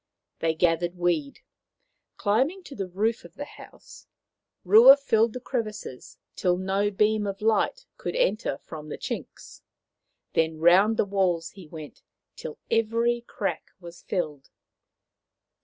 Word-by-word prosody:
They 160 0 0
gathered 175 +1 +1
weed. 170 -5 -1 0.8
Climbing 265 - +1
to 285 - -11
the 195 -3 -4
roof 215 +6 -1
of - - -14
the - - -6
house, - - -15 0.6
Rua 230 +9 +9
filled 230 -5 +2
the 250 - -5
crevices 215 - -5 0.2
till 180 -1 +1
no 195 +2 0
beam 210 +1 +1
of 195 0 -4
light 225 - +1
could - - -4
enter - - 0
from 155 -1 -10
the - - -5
chinks. - - -7 0.7
Then 160 -1 +1
round 185 +7 +5
the - - +2
walls 185 -4 0
he 190 -5 -13
went, 155 -2 -10 0.3
till 155 - -8
every 230 +1 +1
crack 200 - -3
was 170 -1 -12
filled. 150 -7 -4
195 Hz, 135 wpm, -26 LUFS, 170-225 Hz, 0.8 s, Rua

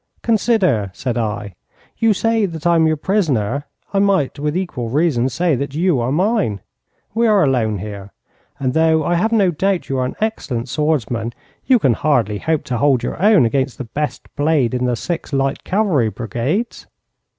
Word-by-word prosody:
'Consider,' 200 - +2
said 120 +3 -3
I, 105 -3 -3 0.5
'you 225 -1 +4
say 225 +1 +1
that 165 -2 -8
I 170 - +4
am 160 -1 +4
your 155 0 +1
prisoner. 145 - 0 0.3
I 195 - +2
might 195 -8 +1
with 150 +3 -1
equal 140 -11 -3
reason 135 -3 +1
say 170 +1 +1
that 140 +2 -4
you 170 -4 +2
are 120 +2 -1
mine. 185 - +1 0.5
We 230 +2 +2
are 210 -3 +4
alone 120 -7 +1
here, 100 0 -7 0.5
and 130 -2 -1
though 160 0 +3
I 175 - 0
have 185 +6 +1
no 200 -5 +3
doubt 190 +3 0
that - - -21
you 135 -1 -1
are 130 - +1
an - - -7
excellent 135 - -2
swordsman, 120 -6 -1 0.3
you 260 - +6
can 135 - +2
hardly 115 -7 +1
hope 160 -2 -1
to 125 - -3
hold 135 -2 +2
your - - -4
own 205 - +5
against 130 +2 -1
the - - -4
best 145 +6 -4
blade 145 -4 +1
in 125 0 0
the 125 -1 +1
six 165 +3 -4
light 135 0 0
cavalry 185 - +1
brigades.' 120 - -3
145 Hz, 185 wpm, -19 LUFS, 120-185 Hz, 0.5 s, you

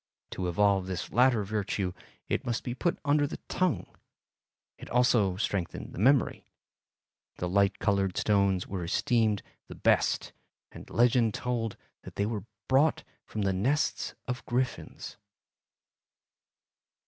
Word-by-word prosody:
To 90 - -3
evolve 95 +1 +2
this 90 -2 -4
latter 125 -3 +4
virtue 100 -2 -2 0.3
it - - -1
must 120 -1 -2
be 120 - -3
put 170 +7 0
under 145 0 +3
the - - -6
tongue. 150 - 0 0.9
It - - -10
also 120 -6 +3
strengthened 95 -3 -3
the - - -7
memory. 130 +4 +3 0.9
The 90 - -3
light 100 +2 +2
colored 100 -2 +1
stones 100 -3 +2
were 95 -3 -4
esteemed 110 +4 +1 0.2
the - - -9
best - - +2 0.4
and - - -11
legend 120 -2 +3
told 115 -3 -2 0.2
that - - -11
they 100 - 0
were 105 -2 -3 0.2
brought 150 +3 +3 0.2
from 105 - -3
the 95 -1 +1
"nests 130 +11 0
of 125 0 -3
griffons." 125 +1 -3
105 Hz, 130 wpm, -29 LUFS, 95-125 Hz, 0.9 s, latter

